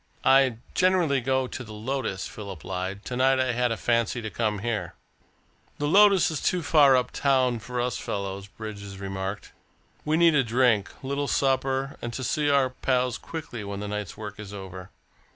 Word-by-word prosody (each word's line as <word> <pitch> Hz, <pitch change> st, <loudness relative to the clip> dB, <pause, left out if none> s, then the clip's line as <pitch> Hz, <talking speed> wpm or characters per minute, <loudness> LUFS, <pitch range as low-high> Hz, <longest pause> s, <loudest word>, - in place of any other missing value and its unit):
"I 135 Hz, -3 st, +5 dB, 0.2 s
generally 175 Hz, -7 st, +3 dB
go 130 Hz, +1 st, +1 dB
into 130 Hz, 0 st, -6 dB
the 110 Hz, -2 st, -10 dB
Lotus," 110 Hz, -3 st, -3 dB
Philip 100 Hz, -7 st, -8 dB
lied. 95 Hz, +2 st, -4 dB
"To 125 Hz, -, -4 dB
night 130 Hz, +1 st, +3 dB
I 130 Hz, -1 st, +2 dB
had 120 Hz, 0 st, +1 dB
a 115 Hz, -, -1 dB
fancy 115 Hz, 0 st, +1 dB
to 110 Hz, -, -4 dB
come 110 Hz, -2 st, -1 dB
here." 105 Hz, -7 st, -2 dB, 0.8 s
"The 145 Hz, -, -1 dB
Lotus 195 Hz, +1 st, +5 dB
is 155 Hz, -, -3 dB
too 180 Hz, -2 st, 0 dB
far 140 Hz, -3 st, +6 dB
up 125 Hz, -1 st, -1 dB
town 130 Hz, -4 st, +2 dB
for 120 Hz, +3 st, -5 dB
us 125 Hz, 0 st, -1 dB
fellows," 100 Hz, -1 st, -4 dB
Bridges 100 Hz, -2 st, -8 dB
remarked. 95 Hz, +1 st, -5 dB, 0.5 s
"We 155 Hz, +1 st, +1 dB
need 170 Hz, -1 st, +5 dB
a 140 Hz, -2 st, +4 dB
drink, 115 Hz, -4 st, +2 dB
a -, -, -7 dB
little 140 Hz, +1 st, -1 dB
supper, 135 Hz, 0 st, 0 dB
and 120 Hz, -, -4 dB
to 130 Hz, -, -4 dB
see 145 Hz, +3 st, +1 dB
our 135 Hz, -2 st, +3 dB
pals 125 Hz, -1 st, 0 dB
quickly 150 Hz, -9 st, -7 dB
when 100 Hz, 0 st, -5 dB
the 105 Hz, -, -4 dB
night's 105 Hz, -2 st, -5 dB
work 105 Hz, -1 st, -7 dB
is 105 Hz, -2 st, -8 dB
over. 95 Hz, -1 st, -8 dB
125 Hz, 190 wpm, -26 LUFS, 105-135 Hz, 0.8 s, far